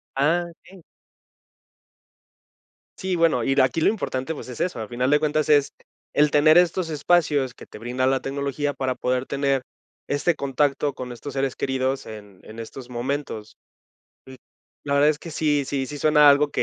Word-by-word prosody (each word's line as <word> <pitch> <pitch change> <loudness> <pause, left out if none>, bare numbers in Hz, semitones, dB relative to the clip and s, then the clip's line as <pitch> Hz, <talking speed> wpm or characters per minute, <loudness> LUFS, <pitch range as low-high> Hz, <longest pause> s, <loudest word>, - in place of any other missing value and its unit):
Ah, 165 +6 +2
okey. 180 +1 -18 2.1
Sí, 190 -1 -2
bueno, 165 -8 +2
y 135 - +1
el 135 - +4
aquí 130 +5 +1
lo - - +4
importante, 160 -8 -3
pues, - - -9
es 125 - -8
eso, 180 -9 -2
a 110 - -5
final 125 +2 -1
de 150 0 +4
cuentas, 155 0 0
es 145 -2 +4 0.4
el 150 0 +4
tener 155 +3 +5
estos 175 0 +2
espacios 150 -4 +1
que - - -13
te - - -12
brinda 125 +3 -2
la 130 0 +2
tecnología 140 +1 -2
para 130 -1 -2
poder 125 0 -1
tener 140 -1 0 0.5
este 150 +4 +1
contacto 140 +1 0
con 125 -1 -7
estos 140 +4 -8
seres 135 -1 -1
queridos 130 0 -1
en 105 -3 -11
en 110 +1 -11
estos 125 +2 -9
momentos. 120 -3 -4 0.7
Sí. 130 0 -11 0.5
La 140 -1 -1
verdad 145 +1 +5
es 155 - +1
que 165 - -9
sí 150 -2 +1
sí 135 -1 -2
sí 145 - -7
suena 150 0 +5
algo 145 +1 +5
140 Hz, 175 wpm, -23 LUFS, 130-150 Hz, 2.1 s, tener